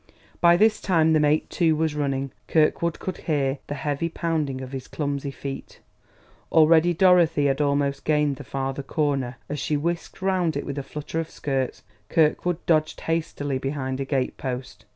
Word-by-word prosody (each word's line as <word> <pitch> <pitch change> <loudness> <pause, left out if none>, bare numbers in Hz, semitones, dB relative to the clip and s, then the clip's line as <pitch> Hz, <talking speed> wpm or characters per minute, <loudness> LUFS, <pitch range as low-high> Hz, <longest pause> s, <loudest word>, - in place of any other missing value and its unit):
By 170 0 +6
this 215 +2 +3
time 160 -4 +3
the 155 - +4
mate, 150 +1 +2
too, 165 -3 +2
was 160 0 0
running; 135 -2 -2 0.2
Kirkwood 160 +1 +2
could 185 - -5
hear 140 -3 -1
the 145 - -4
heavy 145 +3 -2
pounding 160 -5 -2
of 130 -1 -7
his 135 -1 -6
clumsy 140 -2 -3
feet. 135 +1 -7 0.7
Already 160 +1 +5
Dorothy 175 -4 +4
had 140 +1 +1
almost 140 -1 0
gained 150 -2 +1
the 145 - -8
farther 135 +2 -3
corner; 135 -3 -1
as 150 0 -4
she 150 - 0
whisked 170 +3 -3
round 185 -5 +1
it 145 - -4
with 140 - -4
a - - -2
flutter 150 +3 -5
of 165 - -3
skirts, 135 -3 -3 0.3
Kirkwood 165 +2 +1
dodged 155 -2 +1
hastily 145 -4 -2
behind 135 -1 -3
a 135 - -2
gate 135 -2 -1
post. 125 -4 -6
150 Hz, 170 wpm, -24 LUFS, 135-165 Hz, 0.7 s, By